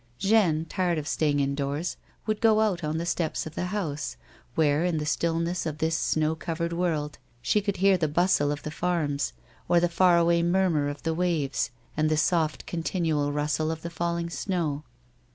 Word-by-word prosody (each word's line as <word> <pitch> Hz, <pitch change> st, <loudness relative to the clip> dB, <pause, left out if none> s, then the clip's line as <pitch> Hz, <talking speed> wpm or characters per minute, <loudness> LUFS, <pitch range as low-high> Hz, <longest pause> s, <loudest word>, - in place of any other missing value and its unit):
Jeanne, 190 Hz, -6 st, +3 dB
tired 175 Hz, 0 st, 0 dB
of 150 Hz, -1 st, -4 dB
sta}' 155 Hz, 0 st, +1 dB
ing 145 Hz, 0 st, +1 dB
indoors, 140 Hz, +4 st, -1 dB, 0.3 s
would 215 Hz, -1 st, -1 dB
go 220 Hz, -2 st, +5 dB
out 190 Hz, -6 st, +1 dB
on 155 Hz, +1 st, -1 dB
the 170 Hz, -, -2 dB
stops 170 Hz, -2 st, -1 dB
of 155 Hz, -, -7 dB
the 180 Hz, -, -2 dB
house, 160 Hz, -, -3 dB, 0.4 s
where, 150 Hz, 0 st, +3 dB
in 175 Hz, -2 st, +1 dB
the 150 Hz, -, -2 dB
stillness 170 Hz, +2 st, 0 dB
of 155 Hz, -1 st, -4 dB
this 160 Hz, +1 st, 0 dB
snow 155 Hz, -1 st, +1 dB
covered 170 Hz, +1 st, -3 dB
worUl, 165 Hz, -4 st, -1 dB, 0.3 s
slio 210 Hz, -, +2 dB
conld 200 Hz, -2 st, 0 dB
henv 190 Hz, -1 st, +4 dB
(he 155 Hz, -, +3 dB
bustle 150 Hz, -2 st, +2 dB
of 145 Hz, 0 st, -4 dB
the 150 Hz, -, -4 dB
farms, 150 Hz, -, -1 dB, 0.4 s
or 175 Hz, -, +5 dB
the 175 Hz, -, +3 dB
far 175 Hz, +1 st, +4 dB
away 170 Hz, 0 st, +3 dB
murmur 170 Hz, -4 st, +2 dB
of 145 Hz, 0 st, -7 dB
the 165 Hz, -, 0 dB
waves 160 Hz, -8 st, 0 dB, 0.3 s
and 155 Hz, 0 st, +2 dB
the 155 Hz, -, +2 dB
soft 155 Hz, 0 st, +1 dB
continual 160 Hz, -4 st, -1 dB
rustle 150 Hz, +2 st, 0 dB
of 160 Hz, 0 st, -4 dB
the 170 Hz, -, -5 dB
falling 170 Hz, 0 st, -2 dB
snow. 165 Hz, -7 st, -2 dB
165 Hz, 190 wpm, -27 LUFS, 150-175 Hz, 0.4 s, go